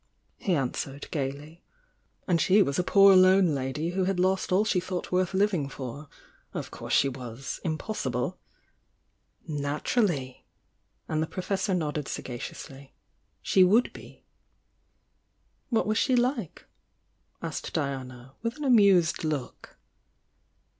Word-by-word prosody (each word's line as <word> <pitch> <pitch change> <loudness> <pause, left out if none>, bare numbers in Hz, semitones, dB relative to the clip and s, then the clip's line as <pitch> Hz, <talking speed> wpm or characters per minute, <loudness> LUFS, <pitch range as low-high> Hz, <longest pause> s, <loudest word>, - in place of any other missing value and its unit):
he 185 -4 0
answered, 135 0 -3
gaily. 145 +3 -5 0.6
And 170 -4 +2
she 200 +5 +5
was 140 -1 -2
a - - +2
poor 195 +1 +6
lone 185 -2 +5
lady 140 +5 -2
who 185 0 0
had 190 -1 -1
lost 185 +1 +1
all 195 +4 +3
she 200 -3 +2
thought 180 0 -5
worth 185 +1 +1
living 190 -8 +1
for. 140 +2 -8 0.5
Of - - -5
course - - -8
she 140 - +4
was— 125 -1 -6
impossible! 155 - -3 1.1
"Naturally!" 145 - -1 0.6
and 155 0 -1
the 160 - -1
Professor 190 +2 -2
nodded 150 -4 -2
sagacious 120 -2 -6
ly— 135 -2 -14 0.5
"She 190 - +5
would 215 +7 +3
be!",. - - -14 1.4
'What 230 - +1
was 215 +1 +1
she 255 - +2
like?" 245 - -1 0.8
asked - - -4
Diana, 130 -3 -4
with 230 +3 -3
an 300 - -6
amused 200 - +4
look. 150 -5 -5
170 Hz, 125 wpm, -27 LUFS, 140-195 Hz, 1.4 s, poor